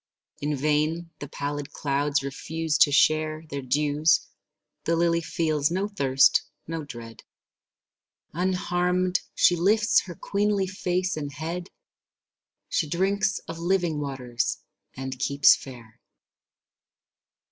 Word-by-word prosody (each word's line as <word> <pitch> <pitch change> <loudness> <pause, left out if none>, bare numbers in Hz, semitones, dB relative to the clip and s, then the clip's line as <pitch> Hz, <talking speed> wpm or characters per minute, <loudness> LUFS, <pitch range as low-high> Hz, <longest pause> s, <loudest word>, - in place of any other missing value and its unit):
In 145 +1 -1
vain 155 +4 0
the 145 - -6
pallid 145 +1 -5
clouds 140 0 0
refuse 160 +3 -3
to 145 - +6
share 155 +2 +2
Their 140 0 -4
dews; 150 +4 +2 0.6
the 165 - +2
lily 170 0 +2
feels 155 -4 0
no 190 +4 -1
thirst, 135 -10 +3 0.2
no 165 -1 -4
dread. 115 -5 -10 1.1
Unharmed 180 +1 0 0.2
she 175 - +5
lifts 210 +5 +3
her 175 -3 -8
queenly 205 +1 0
face 185 -1 -1
and 145 -2 -4
head; 165 +5 -5 1.0
She 155 - -1
drinks 195 +5 +1
of 165 0 -6
living 175 -3 0
waters 125 -4 -2 0.4
and 130 -1 -5
keeps 140 +1 +5
fair. 120 -4 -12
155 Hz, 115 wpm, -26 LUFS, 140-180 Hz, 1.1 s, to